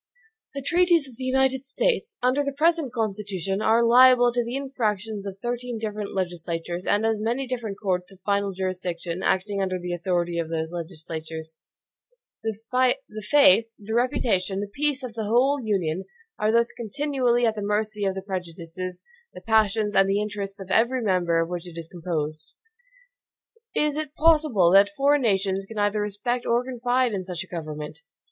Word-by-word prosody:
The 275 Hz, -, -4 dB
treaties 345 Hz, -1 st, +3 dB
of 245 Hz, -4 st, -14 dB
the 260 Hz, -, -6 dB
United 265 Hz, 0 st, +1 dB
States, 460 Hz, -, -1 dB
under 255 Hz, +3 st, +3 dB
the 280 Hz, -, -2 dB
present 315 Hz, -1 st, +1 dB
Constitution, 200 Hz, -4 st, -2 dB
are 225 Hz, +2 st, +4 dB
liable 245 Hz, +1 st, +7 dB
to 240 Hz, 0 st, +1 dB
the 235 Hz, +2 st, -4 dB
infractions 220 Hz, -7 st, -2 dB
of 195 Hz, -1 st, -6 dB
thirteen 240 Hz, 0 st, -3 dB
different 210 Hz, -2 st, -4 dB
legislatures, 175 Hz, -1 st, -3 dB
and 205 Hz, +2 st, +2 dB
as 220 Hz, -1 st, +1 dB
many 240 Hz, +5 st, -1 dB
different 235 Hz, -6 st, -4 dB
courts 180 Hz, -2 st, -1 dB
of 190 Hz, -, -16 dB
final 200 Hz, 0 st, +1 dB
jurisdiction, 180 Hz, -2 st, -4 dB
acting 200 Hz, +1 st, 0 dB
under 185 Hz, -1 st, -1 dB
the 180 Hz, 0 st, -4 dB
authority 175 Hz, -1 st, -1 dB
of 165 Hz, -1 st, -3 dB
those 160 Hz, 0 st, -2 dB
legislatures. 160 Hz, -2 st, -7 dB, 0.8 s
The 220 Hz, -2 st, -3 dB, 0.7 s
faith, 285 Hz, -5 st, +6 dB
the 210 Hz, +1 st, -6 dB
reputation, 225 Hz, -6 st, +1 dB
the 205 Hz, -, -2 dB
peace 290 Hz, -1 st, 0 dB
of 250 Hz, -3 st, -6 dB
the 220 Hz, -1 st, -3 dB
whole 255 Hz, +6 st, +3 dB
Union, 190 Hz, -4 st, -1 dB, 0.3 s
are 215 Hz, +1 st, +2 dB
thus 235 Hz, +1 st, +3 dB
continually 245 Hz, 0 st, 0 dB
at 225 Hz, -, +2 dB
the 210 Hz, -, -5 dB
mercy 210 Hz, +1 st, -1 dB
of 195 Hz, -1 st, 0 dB
the 190 Hz, -, -5 dB
prejudices, 180 Hz, -1 st, -6 dB, 0.3 s
the -, -, -9 dB
passions, 220 Hz, -1 st, +2 dB
and 195 Hz, 0 st, +4 dB
the 200 Hz, +1 st, +2 dB
interests 205 Hz, -1 st, -4 dB
of 190 Hz, -1 st, -8 dB
every 240 Hz, +2 st, +2 dB
member 180 Hz, -5 st, +2 dB
of 165 Hz, +1 st, -1 dB
which 175 Hz, 0 st, -4 dB
it 170 Hz, -1 st, -10 dB
is 165 Hz, -1 st, -6 dB
composed. 160 Hz, -3 st, -4 dB, 1.2 s
Is 300 Hz, -1 st, +1 dB
it 305 Hz, -1 st, -4 dB
possible 300 Hz, -, +4 dB
that 195 Hz, +1 st, +7 dB
foreign 290 Hz, 0 st, +2 dB
nations 195 Hz, -3 st, 0 dB
can 225 Hz, -, -9 dB
either 205 Hz, 0 st, +1 dB
respect 210 Hz, +4 st, -2 dB
or 235 Hz, +1 st, +2 dB
confide 250 Hz, -1 st, 0 dB
in 190 Hz, -2 st, -2 dB
such 180 Hz, -2 st, -5 dB
a -, -, -16 dB
government? 155 Hz, -2 st, -6 dB
210 Hz, 170 wpm, -25 LUFS, 185-245 Hz, 1.2 s, liable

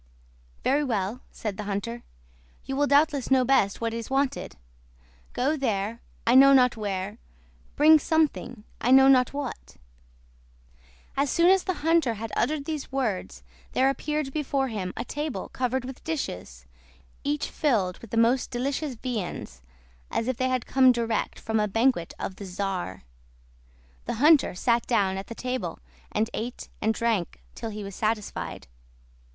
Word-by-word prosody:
'" -, -, -31 dB
"Very 285 Hz, +3 st, +2 dB
well," 225 Hz, -2 st, -2 dB
said 210 Hz, -3 st, -5 dB
the 210 Hz, -, -5 dB
hunter. 210 Hz, +4 st, -3 dB, 0.6 s
"You 270 Hz, -, -3 dB
will 290 Hz, +1 st, +2 dB
doubtless 285 Hz, -1 st, +3 dB
know 260 Hz, -1 st, +4 dB
best 220 Hz, -7 st, +2 dB
what 230 Hz, 0 st, -1 dB
is 230 Hz, +1 st, -5 dB
wanted: 275 Hz, 0 st, -1 dB, 0.8 s
Go 275 Hz, +5 st, +1 dB
there, 230 Hz, -4 st, -2 dB, 0.2 s
I 235 Hz, -, +4 dB
know 275 Hz, +2 st, +8 dB
not 250 Hz, -2 st, +5 dB
where; 205 Hz, 0 st, -4 dB, 0.6 s
bring 310 Hz, +1 st, +7 dB
something, 300 Hz, -8 st, 0 dB, 0.2 s
I 240 Hz, -, +1 dB
know 265 Hz, +1 st, +8 dB
not 255 Hz, -2 st, +5 dB
what." 280 Hz, -3 st, -6 dB, 1.4 s
As 280 Hz, +1 st, +1 dB
soon 340 Hz, +4 st, +4 dB
as 385 Hz, -1 st, +3 dB
the 370 Hz, -5 st, -3 dB
hunter 325 Hz, -8 st, +3 dB
had 220 Hz, +1 st, -6 dB
uttered 295 Hz, -2 st, 0 dB
these 305 Hz, -3 st, -4 dB
words 200 Hz, -, -2 dB, 0.3 s
there 265 Hz, +1 st, +4 dB
appeared 300 Hz, -1 st, -3 dB
before 275 Hz, -3 st, 0 dB
him 195 Hz, -5 st, -3 dB
a -, -, -3 dB
table 295 Hz, -9 st, -4 dB
covered 255 Hz, 0 st, -1 dB
with 265 Hz, 0 st, -9 dB
dishes, 90 Hz, -, -5 dB, 0.6 s
each 295 Hz, +1 st, -1 dB
filled 210 Hz, -, 0 dB
with 230 Hz, -, -12 dB
the 230 Hz, -, -3 dB
most 235 Hz, +3 st, +3 dB
delicious 270 Hz, +2 st, -2 dB
viands, 210 Hz, -, -5 dB, 0.5 s
as 230 Hz, -, -1 dB
if 255 Hz, -, 0 dB
they 260 Hz, 0 st, +1 dB
had 255 Hz, -1 st, -1 dB
come 260 Hz, -1 st, +5 dB
direct 230 Hz, -2 st, -1 dB
from 220 Hz, -1 st, -1 dB
a 210 Hz, -, +2 dB
banquet 225 Hz, -4 st, +1 dB
of 190 Hz, -, -5 dB
the 200 Hz, -, -7 dB
czar. 185 Hz, -, -4 dB, 1.0 s
The -, -, -2 dB
hunter 290 Hz, -, +5 dB
sat 235 Hz, +4 st, +1 dB
down 200 Hz, -5 st, +2 dB
at 195 Hz, -, -8 dB
the 230 Hz, -, -7 dB
table, 255 Hz, +1 st, -3 dB, 0.3 s
and 215 Hz, +1 st, +1 dB
ate 240 Hz, +3 st, -5 dB
and 220 Hz, -, +2 dB
drank 220 Hz, -, -1 dB
till 225 Hz, -, -5 dB
he 210 Hz, -1 st, -6 dB
was 200 Hz, 0 st, -7 dB
satisfied. 215 Hz, -1 st, -3 dB
245 Hz, 160 wpm, -26 LUFS, 210-275 Hz, 1.4 s, know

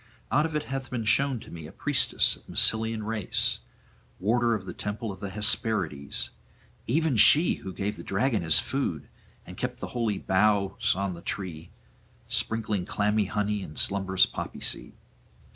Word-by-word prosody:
Out 150 Hz, +4 st, +3 dB
of 160 Hz, -, -7 dB
it 150 Hz, -, 0 dB
hath 135 Hz, -1 st, -5 dB
been 120 Hz, -3 st, -3 dB
shown 135 Hz, +3 st, +3 dB
to -, -, -12 dB
me 80 Hz, -2 st, -8 dB
a -, -, -12 dB
priestess -, -, +2 dB
of -, -, -20 dB
Massylian 110 Hz, 0 st, +2 dB
race, 110 Hz, -2 st, 0 dB, 0.6 s
warder 115 Hz, +4 st, +2 dB
of 100 Hz, -3 st, -6 dB
the -, -, -6 dB
temple 105 Hz, +1 st, -4 dB
of 95 Hz, -, -10 dB
the 100 Hz, -1 st, -5 dB
Hesperides, 100 Hz, -, 0 dB, 0.6 s
even 155 Hz, +2 st, +1 dB
she 150 Hz, -, +6 dB
who 95 Hz, -, -6 dB
gave 100 Hz, +3 st, -3 dB
the -, -, -8 dB
dragon 110 Hz, +3 st, 0 dB
his 80 Hz, -2 st, +3 dB
food, 90 Hz, -, -1 dB, 0.4 s
and 90 Hz, -, -11 dB
kept 125 Hz, 0 st, -3 dB
the -, -, -6 dB
holy 115 Hz, -5 st, 0 dB
boughs 100 Hz, 0 st, +2 dB
on 100 Hz, -1 st, -2 dB
the 85 Hz, -, -10 dB
tree, 85 Hz, -4 st, -5 dB, 0.6 s
sprinkling 110 Hz, -4 st, -1 dB
clammy 105 Hz, +2 st, +1 dB
honey 105 Hz, +1 st, -1 dB
and 75 Hz, -5 st, -9 dB
slumberous 95 Hz, -1 st, +3 dB
poppy -, -, -6 dB
seed. -, -, -2 dB
105 Hz, 165 wpm, -27 LUFS, 95-115 Hz, 0.6 s, she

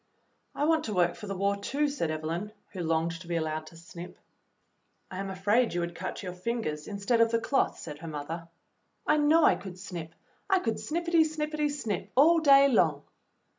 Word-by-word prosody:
"I 290 Hz, -, 0 dB
want 320 Hz, 0 st, +2 dB
to 215 Hz, -, -3 dB
work 175 Hz, -1 st, +3 dB
for 210 Hz, -, -9 dB
the 195 Hz, -1 st, -4 dB
war, 200 Hz, +1 st, +1 dB
too," 275 Hz, +9 st, -1 dB
said 280 Hz, -, -2 dB
Evelyn, 160 Hz, +6 st, -3 dB, 0.2 s
who 185 Hz, -, -5 dB
longed 165 Hz, +1 st, -1 dB
to 175 Hz, -, -12 dB
be 170 Hz, -, -2 dB
allowed 155 Hz, -1 st, -2 dB
to 165 Hz, -, -13 dB
snip. 170 Hz, +1 st, -10 dB, 0.9 s
*'I 185 Hz, -, -5 dB
am 195 Hz, 0 st, -3 dB
afraid 205 Hz, +4 st, +1 dB
you 175 Hz, -, 0 dB
would 170 Hz, 0 st, -3 dB
cut 170 Hz, -, -5 dB
your 180 Hz, -2 st, -5 dB
fingers 180 Hz, -6 st, -3 dB
instead 210 Hz, +3 st, +1 dB
of 230 Hz, -, +5 dB
the 230 Hz, 0 st, +1 dB
cloth," 270 Hz, +4 st, +1 dB
said 150 Hz, -2 st, -8 dB
her 165 Hz, -, -8 dB
mother. 160 Hz, +2 st, -5 dB, 0.6 s
"I 300 Hz, -, +3 dB
know 305 Hz, +2 st, +4 dB
I -, -, +6 dB
could 180 Hz, -1 st, -8 dB
snip. 170 Hz, -4 st, -7 dB, 0.3 s
I 385 Hz, -, +5 dB
could 225 Hz, -11 st, -1 dB
snippity, 335 Hz, 0 st, +2 dB
snippity, 305 Hz, -1 st, -1 dB
snip 220 Hz, -9 st, -3 dB
all 325 Hz, +6 st, +6 dB
day 280 Hz, -3 st, +7 dB
long." 160 Hz, -, +2 dB
200 Hz, 200 wpm, -29 LUFS, 170-280 Hz, 0.9 s, day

